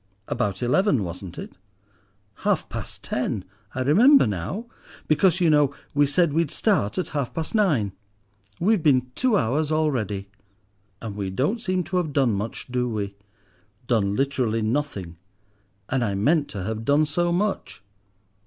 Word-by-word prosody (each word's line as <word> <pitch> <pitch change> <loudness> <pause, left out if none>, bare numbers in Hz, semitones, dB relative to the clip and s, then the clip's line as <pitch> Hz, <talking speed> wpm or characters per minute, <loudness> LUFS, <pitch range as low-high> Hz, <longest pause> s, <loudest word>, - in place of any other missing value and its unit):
"About 100 +3 -2
eleven, 140 - +2
wasn't 90 0 -7
it?" - - -7 0.8
"Half - - 0
past - - -7
ten. 115 -6 -2 0.3
I 130 - -1
remember 225 - +6
now; 105 - -3 0.4
because, 170 +3 +3
you 175 - +3
know, 150 -3 +3 0.2
we 145 0 +4
said 150 +2 +2
we'd 165 -1 +1
start 185 - +1
at 185 - -1
half 140 -5 -3
past 160 -1 -3
nine. 155 - +2 0.7
We've 205 +2 +3
been 130 -4 +3
two 250 - +2
hours 150 +3 0
already!" 120 -11 0 0.8
"And 110 -3 -5
we 100 -2 -3
don't 145 - -1
seem 185 -4 0
to 185 - -2
have 160 -5 -1
done 135 -5 +3
much, 105 +3 -4
do 125 0 0
we?" 100 -3 -3 0.7
"Done 105 -5 +1
literally 125 -5 0
nothing, 110 - -2 0.7
and 130 -1 0
I 100 -3 -1
meant 145 +9 +2
to 100 -3 -6
have 110 +2 -3
done 145 +5 +3
so 175 +3 0
much. 195 - -2
140 Hz, 155 wpm, -24 LUFS, 110-165 Hz, 0.8 s, remember